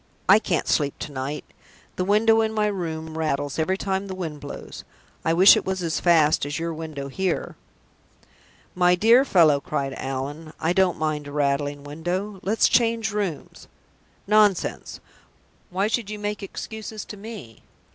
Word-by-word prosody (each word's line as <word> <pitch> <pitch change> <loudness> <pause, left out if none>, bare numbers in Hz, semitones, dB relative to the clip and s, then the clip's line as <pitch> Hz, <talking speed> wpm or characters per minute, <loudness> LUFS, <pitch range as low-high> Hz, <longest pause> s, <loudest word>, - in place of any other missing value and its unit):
I 200 +3 +7
can't 175 -6 -1
sleep 145 -2 +1
to 150 - -6
night. 135 +2 -4 0.5
The 185 - -1
window 220 +3 +4
in 220 0 -1
my 215 -1 +1
room 160 -5 -4
rattles 145 -2 -1
every 185 +4 +1
time 195 0 -2
the 190 - -5
wind 160 -5 -5
blows. 145 - -9 0.4
I 160 - +1
wish 185 +4 +8
it - - -1
was 190 -1 -3
as 165 -2 -1
fast 160 -3 +4
as 145 +1 -3
your 165 0 -3
window 155 -3 -6
here." 185 +5 -2 1.2
"My 180 0 +4
dear 230 +7 +5
fellow!" 165 - +4
cried 140 -2 -3
Allan, 140 +4 -5
"I 165 +2 +1
don't 185 -1 +2
mind 155 -2 -2
a - - -8
rattling 145 0 -1
window. 175 +7 -4
Let's 205 +3 +2
change 230 -2 +2
rooms. 200 -7 -4 0.6
Nonsense! 210 -3 +2 0.7
Why 190 +2 0
should 220 -1 -1
you 210 - -5
make 210 0 -4
excuses 215 +1 -7
to - - -9
me? 200 - -10
175 Hz, 160 wpm, -24 LUFS, 150-205 Hz, 1.2 s, wish